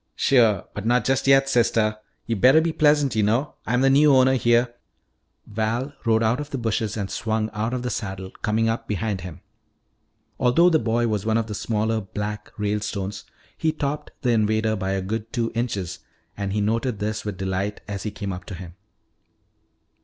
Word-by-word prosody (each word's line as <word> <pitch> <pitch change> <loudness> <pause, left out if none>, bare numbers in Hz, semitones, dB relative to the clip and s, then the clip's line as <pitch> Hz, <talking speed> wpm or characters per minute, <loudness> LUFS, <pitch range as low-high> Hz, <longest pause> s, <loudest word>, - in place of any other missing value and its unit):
"Sure. 115 -8 +3
But 105 +1 -4
not 125 +1 +2
just 135 0 +1
yet, 135 0 +5
sister. 115 -4 +2 0.3
You 115 - -1
better 130 +9 +6
be 165 0 0
pleasant, 145 -4 +3
you 110 - +3
know. 115 +8 +1
I'm 125 +2 +2
the 135 - +5
new 145 0 +6
owner 130 0 +5
here 120 0 +2 0.4
" - - -48
Val 115 +6 -2
rode 115 0 +3
out 115 +4 +2
of 150 0 -5
the 135 - -3
bushes 110 -2 -1
and 100 -2 -2
swung 110 -1 -1
out 110 +2 -2
of 125 -1 -3
the 125 - -2
saddle, 95 -3 -5
coming 110 +1 +1
up 115 +1 -2
behind 105 -2 -2
him. 85 -3 -9 1.0
Although 165 +9 +4
the 160 - +4
boy 120 -1 +1
was 105 -3 -1
one 110 0 +1
of 115 - 0
the 110 - -6
smaller 110 +1 -1
"Black" 105 +2 -5
Ralestones, 105 -1 -3 0.3
he 160 - 0
topped 150 -1 -3
the 125 - +2
invader 110 0 +2
by 95 -1 -2
a 95 -1 -2
good 110 +3 -4
two 115 -2 -1
inches, 100 -7 -3 0.4
and 100 -1 -3
he 105 +1 0
noted 115 +2 0
this 105 +1 -3
with 105 -3 -5
delight 95 +2 -2
as 100 -2 -4
he 110 - -3
came 100 -2 -5
up 90 0 -8
to 95 - -7
him. 90 -1 -9
110 Hz, 195 wpm, -23 LUFS, 105-125 Hz, 1.0 s, better